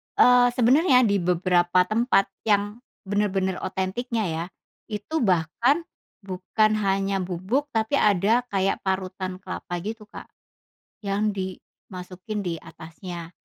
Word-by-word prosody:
eee, 250 0 +6
sebenarnya 255 +2 +5
di 200 -3 +2
beberapa 180 0 +2
tempat 215 -2 +1 0.2
yang, 205 +2 +1 0.3
bener-bener 195 -2 0
otentiknya 220 +5 -2
ya, 165 -1 -2 0.4
itu 215 +10 -3
bahkan 225 - +2 0.4
bukan 195 +3 +1
hanya 195 0 0
bubuk 190 +11 -2
tapi 225 0 -1
ada 210 +4 +3
kayak 195 0 0
parutan 185 -1 -3
kelapa 180 -1 -6
gitu 215 +1 -6
Kak, - - -11 0.7
yang 200 +2 0
dimasukin 185 +1 -7
di 175 -3 -3
atasnya. 170 +1 -9
195 Hz, 110 wpm, -25 LUFS, 185-220 Hz, 0.7 s, eee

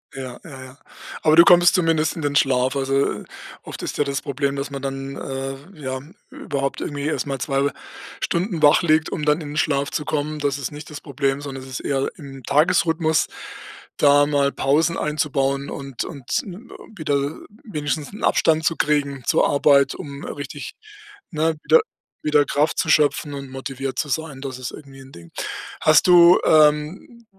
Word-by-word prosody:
Ja, 130 -2 -7
ja, 135 -5 -10
ja. 130 +1 -13 0.4
Aber 155 0 +4
du 170 - +9
kommst 175 -1 +6
zumindest 165 -3 +1
in 160 - -6
den 145 0 -1
Schlaf. 130 -1 +2
Also, 135 0 +1
äh, - - -13 0.4
oft - - -9
ist - - -4
ja - - +4
das 140 -1 -3
Problem, 140 0 -2
dass 140 +1 -4
man 140 -1 -5
dann, 135 0 -5
äh, 135 0 -5 0.2
ja, 130 -1 -4 0.3
überhaupt 140 -2 -3
irgendwie 145 -1 -4
erstmal 140 -3 -2
2 140 +2 0 0.5
Stunden 170 -2 -2
wach 145 +3 +6
liegt, 160 -1 +2
um 150 - -3
dann 150 +2 +2
in 145 -2 -7
'n - - -5
Schlaf 140 -3 0
zu 150 - -3
kommen. 155 0 -2
Das 145 -2 -1
ist 140 -1 -5
nicht 150 +1 -10
das 150 - -8
Problem, 140 -1 -2
sondern 135 -2 -7
es 135 - -11
ist 130 - -5
eher 135 -1 -1
im 135 -4 -10
Tagesrhythmus, 160 +1 +2 0.7
da 145 0 +5
mal 140 -1 +1
Pausen 155 +6 +1
einzubauen 140 -2 -1
und 135 -3 -5
und, 140 -7 -3
äh, - - -9 0.5
wieder 145 -2 -1 0.3
wenigstens 150 -6 -4
'n 205 - -10
Abstand 160 0 +2
zu 165 - +2
kriegen 140 -4 0
zur - - +3
Arbeit, 140 -1 +4
um 140 -1 -8
richtig, 145 0 -7 0.6
ne, 160 0 0
wieder 475 -1 +5 0.4
wieder 150 -1 +3
Kraft 150 +2 0
zu 160 - 0
schöpfen 145 -1 +2
und 140 -1 -7
motiviert 135 0 -5
zu 150 - -2
sein, 150 -2 -3
das 130 -2 -6
ist 125 - -5
irgendwie 135 -2 -12
'n 135 0 -14
Ding. 85 -1 -14 0.5
Hast - - +5
du, 175 0 +7
ähm, 155 +10 +2
145 Hz, 180 wpm, -22 LUFS, 135-155 Hz, 0.7 s, du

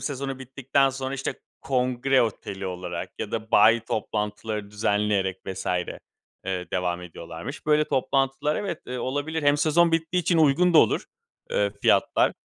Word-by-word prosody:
sezonu 135 -1 -4
bittikten 135 +1 +1
sonra, 135 0 -4
işte, 135 0 -3 0.3
kongre 130 0 +2
oteli 100 -3 -4
olarak 90 -1 -5
ya - - -5
da 110 - -4
bayi 110 +3 +6
toplantıları 105 -1 -3
düzenleyerek 105 -2 0
vs. 95 - -5 0.8
eee, 90 -1 -3
devam 90 -1 -1
ediyorlarmış. 85 - -8
Böyle 150 0 +4
toplantılar 135 +2 0
evet, 190 -6 -3
eee, 125 0 -4
olabilir. 145 +6 -2
Hem 145 0 +4
sezon 165 +3 +3
bittiği 165 +2 +1
için 170 +1 +2
uygun 160 +4 +4
da - - +9
olur, - - +3 0.5
eee, - - +1
fiyatlar. - - +3
130 Hz, 145 wpm, -25 LUFS, 105-145 Hz, 0.8 s, da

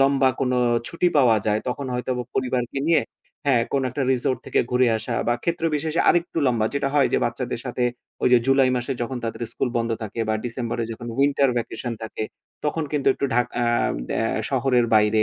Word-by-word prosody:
লম্বা 135 -1 +4
কোনো 125 -1 +1 0.3
ছুটি 175 +1 +1
পাওয়া 120 -5 +5
যায় 105 0 +2
তখন 135 +2 -3
হয়তোবা 125 0 -2
পরিবারকে 125 0 -1
নিয়ে 165 - +4 0.4
হ্যাঁ 125 -4 +4
কোন 140 - +1
একটা 135 +3 -2
রিসোর্ট 130 0 0
থেকে - - +2
ঘুরে 125 0 +3
আসা 120 +1 -3
বা 120 - +3
ক্ষেত্রবিশেষে 165 -1 0
আরেকটু 170 -1 +2
লম্বা 115 -3 +2
যেটা 140 -1 0
হয় 140 -3 +4
যে - - +4
বাচ্চাদের 125 -2 -3
সাথে 125 -1 -1 0.4
ওই - - +4
যে 125 - +8
জুলাই 135 -1 +4
মাসে 125 +2 -2
যখন 130 +2 -3
তাদের 115 +1 -4
স্কুল 135 - -1
বন্ধ 115 0 0
থাকে 110 +2 -5
বা 110 - +2
ডিসেম্বরে 120 -1 -2
যখন 120 +1 -8
winter 140 -1 +3
vacation 120 +1 -4
থাকে, 110 0 -4 0.4
তখন 150 +1 0
কিন্তু 145 -2 +1
একটু - - -3
ঢাকা 120 0 +1
আ - - +2 0.5
অ্যা 115 - +1 0.2
শহরের 125 -2 +2
বাইরে 105 0 +4
125 Hz, 190 wpm, -23 LUFS, 120-140 Hz, 0.5 s, যে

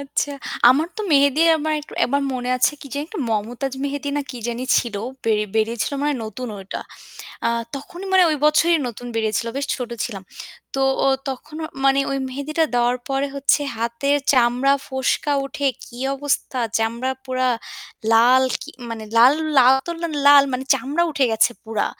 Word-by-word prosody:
আচ্ছা। 280 +1 -2 0.4
আমার 305 +6 +2
তো - - -4
মেহেদী 280 +2 +4 0.2
আমার 310 +1 -1
একটু 295 - -14
একবার 280 +3 0
মনে 250 0 -3
আছে 255 - +3
কি - - -10
জানি 285 - -2
একটা 370 -1 -6
মমতাজ 235 +5 -2
মেহেদী 285 0 -3
না 290 - +1
কি 250 - -7
জানি 240 +2 -3
ছিল, 235 -3 -4 0.3
বে 225 - +2 0.2
বেরিয়েছিল 225 +3 0
মানে 295 0 +1
নতুন 235 +3 -6
ওইটা। 195 0 -6 0.7
আ - - +3 0.3
তখনই 350 +7 -9
মানে 375 - +6
ওই 305 - 0
বছরই 330 +2 +4
নতুন 245 +1 -9
বেরিয়েছিল, 220 0 0
বেশ 280 - -2
ছোট 250 -2 -5
ছিলাম। 200 -6 -6 0.5
তো 270 - -1 0.2
ও - - +4 0.2
তখন 270 +4 -7 0.3
মানে 275 0 +4
ওই 275 - -1
মেহেদীটা 285 +5 -1
দেওয়ার 245 +1 +2
পরে 275 +1 0
হচ্ছে 280 +1 +2 0.2
হাতের 235 +5 0 0.2
চামড়া, 250 +2 +3
ফোস্কা 265 +2 -1
উঠে 285 +1 -3 0.2
কি 240 - -14 0.2
অবস্থা! 275 -2 -2 0.2
চামড়া 235 +4 -1
পুরা 255 -1 0 0.6
লাল। 245 +3 +6 0.2
কি - - -9 0.2
মানে 220 -1 -6
লাল 245 +4 +8 0.5
তো 340 - -3 0.4
লাল 285 0 +9
মানে 255 +1 -2
চামড়া 295 +6 -1
উঠে 280 -3 +1
গেছে 220 +2 +4
পুরা। 220 -2 -1
265 Hz, 165 wpm, -21 LUFS, 235-285 Hz, 0.7 s, লাল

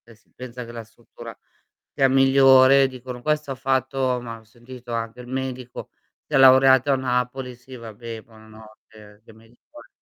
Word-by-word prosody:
si 115 - -33
pensa 125 -1 -9
che 120 - -11
la 115 -1 -8
struttura 115 +1 -14 0.6
sia 135 -1 +2
migliore, 135 0 +5
dicono: 125 -1 -9
"Questo 150 -2 -2
ha - - -6
fatto" 130 -1 -1
ma 115 -1 -8
ho - - -23
sentito 120 +2 -13
anche 115 +1 -5
il 125 - -11
medico, 130 -1 -6 0.3
si 150 - -10
è - - +4
laureato 130 +1 +5
a - - +2
Napoli, 125 0 -3
sì 130 +1 -15
vabbè, 115 0 -9
buonanotte. 110 -1 -18
Che 115 - -17
me 110 +1 -20
ne - - -22
impor 300 0 -17
125 Hz, 175 wpm, -22 LUFS, 115-130 Hz, 0.6 s, migliore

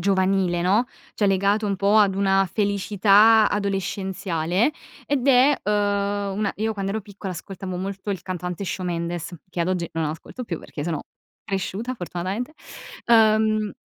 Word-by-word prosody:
giovanile, 190 -1 +1
no, 200 +8 +2 0.3
cioè 205 - +1
legato 200 +2 +2
un 200 -1 -1
po' 200 +3 +3
ad 195 -2 +4
una 195 -1 +2
felicità 205 +1 +4
adolescenziale 195 - -1 0.3
ed 275 -2 0
è, 270 +2 +6
uhm, 205 -1 0
una 210 -1 0
io 220 +1 -1
quando 195 -2 -3
ero 220 +2 -2
piccola 200 -2 -7
ascoltavo 185 +1 -6
molto 195 +2 -4
il 190 -4 -2
cantante 180 0 -4
Shawn 180 0 -3
Mendes, 170 0 -3 0.2
che 175 - -4
ad 170 - 0
oggi 175 -3 -1
non 160 0 -1
ascolto 160 +11 -6
più 175 -9 -4
perché 145 - -7
sono 160 -1 -2 0.4
cresciuta 200 +4 -3
fortunatamente. 190 - -4 0.5
Uhm, 215 -2 +4
195 Hz, 150 wpm, -23 LUFS, 185-210 Hz, 0.5 s, è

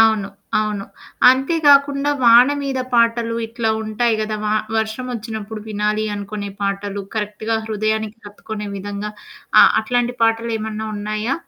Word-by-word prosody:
అవును. 220 -3 +4 0.3
అవును. 210 -2 -2 0.5
అంతే 270 +6 +1
కాకుండా 280 0 +5
వాన 235 +3 +7
మీద 270 -2 -2
పాటలు 230 0 +2
ఇట్లా 225 -1 -1
ఉంటాయి 220 +1 0
గదా! 215 0 -2
వ 210 - 0 0.3
వర్షం 220 +3 -3
ఒచ్చినప్పుడు 220 -1 -6
వినాలి 210 0 0
అనుకునే 205 0 -5
పాటలు, 200 0 -2
కరెక్ట్‌గా 215 +1 -2
హృదయానికి 215 0 -2
హత్తుకునే 210 +1 -7
విధంగా 205 +1 -5 0.5
ఆహ్, - - +6
అట్లాంటి 245 +2 0
పాటలేమన్నా 225 -1 0
ఉన్నాయా? 215 +5 -2
220 Hz, 125 wpm, -20 LUFS, 210-235 Hz, 0.5 s, వాన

